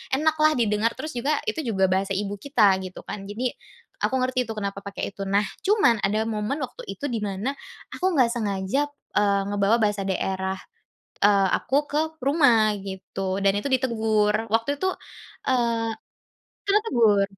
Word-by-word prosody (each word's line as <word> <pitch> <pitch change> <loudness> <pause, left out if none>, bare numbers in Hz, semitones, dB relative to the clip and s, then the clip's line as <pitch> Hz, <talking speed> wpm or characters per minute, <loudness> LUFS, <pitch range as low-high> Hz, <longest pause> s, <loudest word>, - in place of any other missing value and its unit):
enak 310 +3 +3
lah 310 0 +5
didengar, 220 -1 +1
terus 310 0 -5
juga 280 +5 -1
itu 435 -7 -2
juga 195 -9 +1
bahasa 195 +1 0
ibu 200 0 -3
kita, 210 -8 +3
gitu 180 - -11
kan. 195 -1 -7
Jadi, 235 +5 -2 0.5
aku 265 - 0
ngerti 255 -2 0
tu 225 - -5
kenapa 200 -1 -3
pakai 200 0 -5
itu. 195 0 -6
Nah, 200 +2 +2 0.2
cuman 390 - +3
ada 215 +3 +1
momen 225 +6 -2
waktu - - -8
itu 245 +8 -4
di 230 - -1
mana, 205 +5 -2 0.4
aku 370 -2 0
nggak 245 -4 +4
sengaja, 215 +4 -1 0.2
eee, 200 -1 +2
ngebawa 205 +2 +3
bahasa 205 -3 0
daerah, 190 0 -1 0.7
eee, 200 -1 +5
aku 275 - +1
ke 295 +1 0 0.2
rumah 240 -8 +4
gitu 190 0 -4
dan 195 0 +3
itu 280 - -3
ditegur 220 -4 +1
waktu 230 - 0
itu, 375 - +2 0.6
eee 230 -3 +1 0.8
kena 415 +2 +5
tegur. 215 - +4
220 Hz, 160 wpm, -25 LUFS, 200-260 Hz, 0.8 s, lah